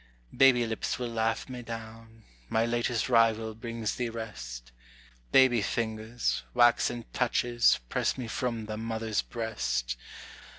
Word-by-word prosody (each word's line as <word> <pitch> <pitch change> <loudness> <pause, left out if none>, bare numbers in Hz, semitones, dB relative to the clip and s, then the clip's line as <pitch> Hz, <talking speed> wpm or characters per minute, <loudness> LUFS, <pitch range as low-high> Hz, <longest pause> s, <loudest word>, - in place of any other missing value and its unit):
Baby 125 -3 +6
lips 110 -1 -2
will 125 -1 -3
laugh 115 0 0
me 125 -2 -6
down; 115 -1 -9 0.3
my 110 +1 +2
latest 120 0 0
rival 115 -2 +3
brings 115 -1 -4
thee 120 -1 -1
rest, - - -7 0.6
Baby 130 -4 +6
fingers, 110 +2 -1
waxen 120 -1 +3
touches, 120 -1 +3
press - - 0
me 125 -3 -4
from 115 -1 -2
the 110 0 -5
mother's 110 -1 -1
breast. 60 - -2
115 Hz, 125 wpm, -29 LUFS, 110-120 Hz, 0.6 s, Baby